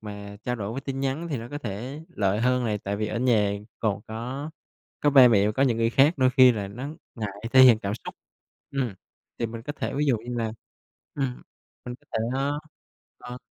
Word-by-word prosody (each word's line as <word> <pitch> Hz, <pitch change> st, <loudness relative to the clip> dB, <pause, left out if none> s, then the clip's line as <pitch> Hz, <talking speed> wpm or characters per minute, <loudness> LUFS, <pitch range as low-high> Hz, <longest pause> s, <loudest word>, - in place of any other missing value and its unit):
mà 100 Hz, -1 st, -8 dB
trao 125 Hz, 0 st, -2 dB
đổi 100 Hz, -1 st, -4 dB
qua 130 Hz, -, -4 dB
tin 135 Hz, -1 st, -3 dB
nhắn 135 Hz, +5 st, -2 dB
thì 145 Hz, -, -1 dB
nó 115 Hz, 0 st, -7 dB
có 145 Hz, -, -4 dB
thể 125 Hz, +4 st, -6 dB
lợi 100 Hz, 0 st, 0 dB
hơn 125 Hz, +1 st, +2 dB
này, 105 Hz, -2 st, 0 dB
tại 100 Hz, +1 st, -3 dB
vì 105 Hz, +1 st, -1 dB
ở 110 Hz, -, -3 dB
nhà 110 Hz, -5 st, +3 dB, 0.3 s
còn 105 Hz, -3 st, 0 dB
có 125 Hz, +7 st, -5 dB, 0.5 s
có 145 Hz, -, +3 dB
ba 130 Hz, -3 st, +8 dB
mẹ 105 Hz, -3 st, +4 dB
và 105 Hz, -, +1 dB
có 130 Hz, -, +1 dB
những 125 Hz, -4 st, +3 dB
người 115 Hz, 0 st, +2 dB
khác, 140 Hz, +7 st, +5 dB
đôi 130 Hz, -1 st, +4 dB
khi 130 Hz, -1 st, +7 dB
là 100 Hz, -4 st, -4 dB
nó 125 Hz, +8 st, -6 dB, 0.3 s
ngại 110 Hz, -4 st, -3 dB, 0.2 s
thể 130 Hz, -, +8 dB
hiện 120 Hz, -4 st, +8 dB
cảm 100 Hz, -2 st, -3 dB
xúc. -, -, -7 dB, 0.6 s
Ừm, 130 Hz, -7 st, -2 dB, 0.4 s
thì 115 Hz, -, 0 dB
mình 115 Hz, 0 st, -7 dB
có 145 Hz, -, -5 dB
thể -, -, -4 dB
ví 145 Hz, +2 st, +1 dB
dụ 130 Hz, -, +3 dB
như 120 Hz, +3 st, -6 dB
là, 110 Hz, -1 st, -1 dB, 0.6 s
ừm, 135 Hz, -3 st, -3 dB, 0.4 s
mình 125 Hz, -, -5 dB
có -, -, -18 dB
thể, -, -, 0 dB, 0.2 s
a 140 Hz, +1 st, 0 dB, 0.7 s
ờ. 125 Hz, 0 st, -8 dB
120 Hz, 225 wpm, -26 LUFS, 110-135 Hz, 0.7 s, ba